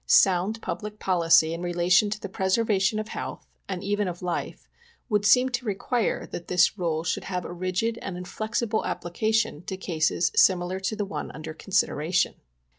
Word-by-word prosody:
Sound 195 +4 +4
public 210 +4 -5
policy 165 -4 +4
in 170 - -5
relation 175 +3 +3
to 210 +1 -3
the 200 - -5
preservation 195 +1 +1
of 215 0 -4
health, - - -6 0.2
and 190 -1 -4
even 205 0 0
of 175 0 -6
life, 175 -1 -4 0.4
would 210 -2 +2
seem 250 +3 +5
to 245 0 -2
require 220 +3 -1
that 170 - -6
this 180 +2 +3
rule 165 -4 -1
should 170 - -2
have 180 -2 -3
a - - -6
rigid 185 +6 -1
and 190 -3 -5
inflexible 220 +4 -2
application 215 0 -1
to 190 - -4
cases 170 -2 0
similar 185 0 +3
to 195 +3 -2
the 210 -1 -2
one 155 -6 -5
under 155 +2 -7
consideration." 175 -1 0
190 Hz, 170 wpm, -26 LUFS, 175-210 Hz, 0.4 s, seem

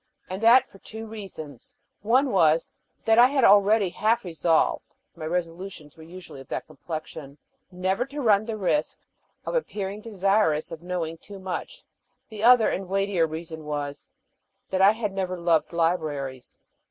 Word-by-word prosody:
And 190 +2 -4
that 245 +3 +6
for 195 - -18
two 220 +3 -9
reasons: 190 - -10 0.3
one 255 +6 +2
was, 165 -4 +3 0.3
that 225 +1 +5
I 245 - +9
had 270 -1 0
already 205 -1 +5
half 225 +6 +1
resolved 165 -1 0 0.2
my 160 -2 -7
resolutions 170 -2 -5
were 160 - -15
usually 170 -3 -11
of 135 - -14
that - - -4
complexion 155 -2 -8 0.3
never 185 +5 -1
to 280 +2 -8
run 215 -5 +3
the 225 -1 -3
risk 215 +10 -1 0.5
of - - -3
appearing 210 - -3
desirous 195 -7 +1
of 165 -1 -7
knowing 170 -2 -4
too 200 +3 -11
much; 190 - -6 0.5
the 215 -2 -8
other 240 -1 +6
and 190 -1 -3
weightier 195 -3 +1
reason 160 0 -7
was, 145 -1 -5 0.6
that 190 0 +1
I 195 +2 +7
had 215 -3 -3
never 185 -1 -2
loved 165 -3 +1
libraries. 155 -6 -2
185 Hz, 155 wpm, -25 LUFS, 160-215 Hz, 0.6 s, I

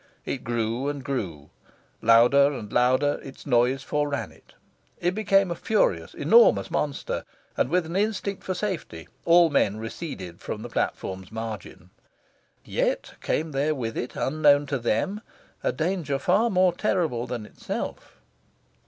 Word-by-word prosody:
It 130 - -4
grew 120 +2 -1
and 145 -2 -5
grew. 85 - -4 0.5
Louder 120 +5 +6
and 110 -6 -7
louder, 130 +4 +3
its 135 - -11
noise 125 +1 +2
foreran 145 0 -2
it. - - -22 0.4
It 175 - +1
became 195 -3 +2
a - - -1
furious, 220 +5 0
enormous 475 +1 +5
monster, - - -2 0.3
and, - - +1
with 180 -1 +2
an 165 +2 -6
instinct 200 -1 -1
for 185 - -2
safety, 175 - -4 0.2
all 170 -1 +6
men 105 -7 +2
receded 110 - -7
from 110 - -5
the 120 - -7
platform's 95 -3 -3
margin. 105 -5 -7 0.7
(Yet - - -1
came 160 +1 -1
there 145 +3 0
with 115 -4 -4
it, 120 - -4
unknown 145 0 +3
to 135 - +1
them, 120 - -1 0.4
a - - +2
danger 155 0 -1
far 190 +11 +2
more 185 -3 +3
terrible 165 - 0
than 120 -4 -4
itself.) - - -6
140 Hz, 145 wpm, -25 LUFS, 115-175 Hz, 0.7 s, Louder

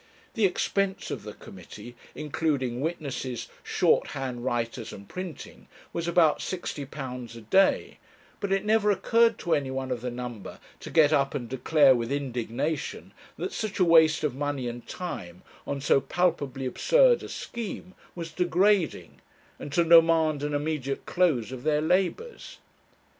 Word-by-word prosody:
The 220 - +2
expense 195 +1 -1
of - - -4
the - - -8
committee, 120 - -11 0.2
including 140 -5 -1
witnesses, 140 -6 -4
shorthand 125 -3 0
writers, 120 -2 -2
and 100 0 -11
printing, 180 -5 -8 0.3
was 170 0 -3
about 170 -3 +4
£60 135 -8 -5
a - - -10
day, 190 - +2 0.4
but 200 -1 -3
it 195 +1 +1
never 215 -1 +3
occurred 230 +3 +3
to 170 - -1
any 140 -3 0
one 130 0 -4
of 120 -2 -2
the 125 - -3
number 120 -4 -7 0.2
to - - -9
get 155 -2 +4
up 140 -1 +1
and 120 -4 -3
declare 135 +3 +4
with 120 0 -2
indignation, 140 +2 -3 0.2
that - - -4
such 215 -3 -3
a 185 - +4
waste 160 -2 +5
of 150 - 0
money 140 -2 -3
and 120 0 -7
time 90 - -7 0.2
on 140 - -2
so 135 0 +3
palpably 145 -7 -1
absurd - - +4
a - - -8
scheme 205 -5 -6 0.2
was 165 -2 -6
degrading, 180 +1 +1 0.4
and 145 - -7
to 170 - +4
demand 165 -2 +5
an 145 0 -2
immediate 145 -2 -2
close 150 -11 +1
of 130 -2 -7
their 150 +1 +1
labours. 190 - -1
150 Hz, 150 wpm, -27 LUFS, 130-180 Hz, 0.4 s, waste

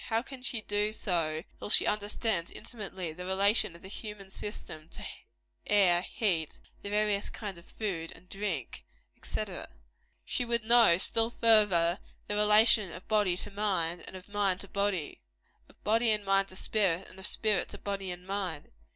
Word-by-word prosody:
How 225 0 0
can 270 -1 -10
she 245 -3 0
do 210 +1 0
so, 165 -6 -1 0.2
till - - -6
she - - +5
understands, 210 -3 0
intimately, 190 -7 -5
the 180 +3 -7
relation 190 0 +3
of 170 - -13
the - - -9
human 205 -1 -8
system 160 -6 -7
to - - -9 0.6
air, 185 -4 +5
heat, 180 -6 -1 0.2
the 200 - -6
various 210 -1 +1
kinds 200 -5 -5
of 170 - -17
food, 180 -5 -4
drink, 190 - -4 0.4
&c.? - - -2 0.8
She - - -1
would 235 -1 0
know, 230 -6 +6
still 225 +4 +1
further, 205 -7 +4 0.3
the - - -3
relation 210 -1 +5
of 180 - -10
body 205 -5 +2
to - - -4
mind, 185 -5 -1
and - - -5
of 185 0 -10
mind 200 -3 +1
to 200 - -8
body 200 -5 -1 0.5
of - - -22
body 225 +2 +3
and 210 -2 +1
mind 195 0 +3
to 185 - -11
spirit, 190 -3 +1
and 190 - -11
of 190 - -1
spirit 210 -5 +1
to - - -9
body 195 -2 -4
and 180 0 -6
mind. 190 -6 -4
200 Hz, 170 wpm, -30 LUFS, 180-210 Hz, 0.8 s, know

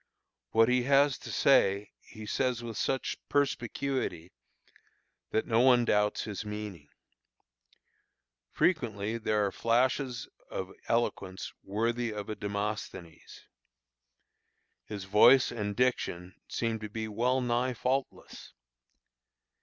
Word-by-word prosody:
What 115 0 +4
he 125 +1 +3
has 140 0 +4
to - - -8
say 100 -7 +3
he 110 0 -11
says 125 +1 -1
with 115 -2 -6
such 135 +5 -1
perspicuity 130 - -1 1.0
that 110 - 0
no 115 -1 +2
one 125 -1 +5
doubts 105 -2 +1
his 105 -2 -5
meaning. 105 -7 -7 1.6
Frequently 115 - 0
there 105 -2 +1
are 100 - -1
flashes 125 +3 0 0.2
of 95 0 -5
eloquence 100 -5 -1
worthy 115 +3 -1
of 105 -1 -6
a 110 - -3
Demosthenes. 100 -5 -5 1.4
His 100 -3 -6
voice 115 +7 +6
and 105 -3 -3
diction 95 -8 -1
seem 115 -1 -2
to 105 -1 -6
be 110 +1 -4
well 120 +5 +1
nigh 125 0 0
faultless. 130 +3 -3
115 Hz, 110 wpm, -30 LUFS, 105-125 Hz, 1.6 s, voice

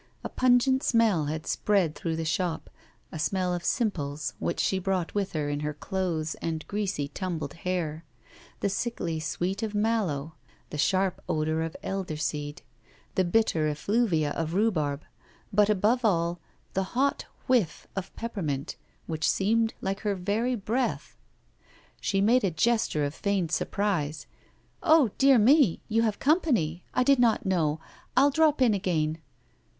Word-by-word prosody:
A - - -4
pungent 255 +1 +3
smell 220 - +3
had 155 +2 -4
spread 195 -7 +1
through 165 0 -3
the 165 0 -3
shop, 170 +1 -2 0.4
a 160 - -6
smell 180 +2 0
of 175 -1 -3
simples, 150 - -1
which 170 - -2
she 190 - +1
brought 185 -2 -1
with 200 -2 -1
her 150 -2 -1
in 145 0 -2
her 150 0 -3
clothes 165 -3 -2
and 160 -2 -3
greasy, 200 -8 -2
tumbled 155 -2 -4
hair; 165 -3 -3 0.6
the - - +2
sickly 190 -6 -2
sweetness 180 +7 -2
of 210 - -9
mallow, 200 -9 0 0.4
the 150 - -4
sharp 190 +3 +1
odour 155 +1 0
of 165 0 -4
elderseed, 150 -6 -3 0.5
the 190 - +2
bitter 175 -4 +2
effluvia 165 -1 +1
of 165 +1 -3
rhubarb, 155 -9 +1 0.5
but, 210 +1 +4
above 215 +5 +2
all, 170 -4 +1 0.3
the 190 +5 -3
hot 280 +2 +1 0.2
whiff 240 -10 +1
of 195 -1 -4
peppermint, 160 - -4 0.3
which 160 -1 -1
seemed 225 +3 +1
like 195 +1 -2
her 205 -2 -1
very 210 +7 0
breath. 210 - -2 0.8
She 195 - 0
made 235 +4 +4
a 195 - +3
gesture 175 -4 +1
of 145 - -3
feigned 195 -3 -1
surprise. 160 -8 -1 0.6
'Oh, 315 - +5
dear 270 -1 +6
me! 240 - +5
you 225 0 +2
have 220 -3 0
company 240 - +1
I 255 - +2
did 275 0 +4
not 230 -3 +3
know; 160 -5 +1 0.4
I'll 280 +2 +6
drop 305 -2 +3
in 235 -4 +4
again. 165 -5 0
190 Hz, 150 wpm, -27 LUFS, 160-225 Hz, 0.8 s, dear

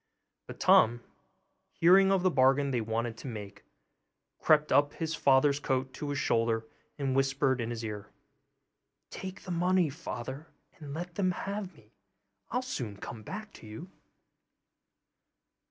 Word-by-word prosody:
But - - -10
Tom, 120 +1 +5 0.7
hearing 190 +3 +5
of 190 -2 +2
the 185 - +3
bargain 135 0 +3
they 120 -3 0
wanted 115 +1 -2
to - - -9
make, 105 -4 -8 0.7
crept 150 -1 +3
up 145 0 +4
his 160 -1 -3
father's 140 -1 +3
coat 130 -2 -1
to 150 - -5
his 145 - -2
shoulder 115 -3 +1 0.3
and 135 -3 -1
whispered 135 -1 +1
in 115 - -3
his 115 -1 -5
ear, 105 -2 -6 1.0
'Take 190 0 -7
the 185 - -6
money, 175 -2 +2
father, 140 -1 -7 0.3
and 145 -2 -7
let 175 +2 -6
them 185 -1 +1
have 195 0 -4
me; 110 -1 -22 0.6
I'll 250 +2 -1
soon 120 - -5
come 110 +3 -8
back 210 - -8
to - - -13
you. 160 - -9
140 Hz, 145 wpm, -30 LUFS, 120-175 Hz, 1.0 s, Tom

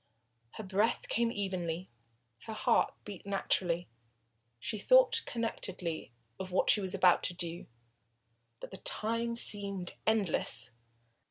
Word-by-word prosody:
Her 220 - -7
breath 205 +4 0
came 235 0 +1
evenly, 185 -4 -3 0.6
her 220 - -4
heart - - +2
beat 205 -3 -8
naturally, 180 -3 -1 0.7
she 215 - -3
thought - - +5
connectedly 190 - -3 0.3
of 190 -1 -5
what 185 - +5
she 210 - +5
was 190 0 -3
about 180 -2 +5
to 175 - -2
do. 170 -1 -4 0.9
But - - -9
the 190 - -5
time 230 +3 -1
seemed 200 -5 0
endless. 175 - +2
195 Hz, 120 wpm, -32 LUFS, 180-220 Hz, 0.9 s, thought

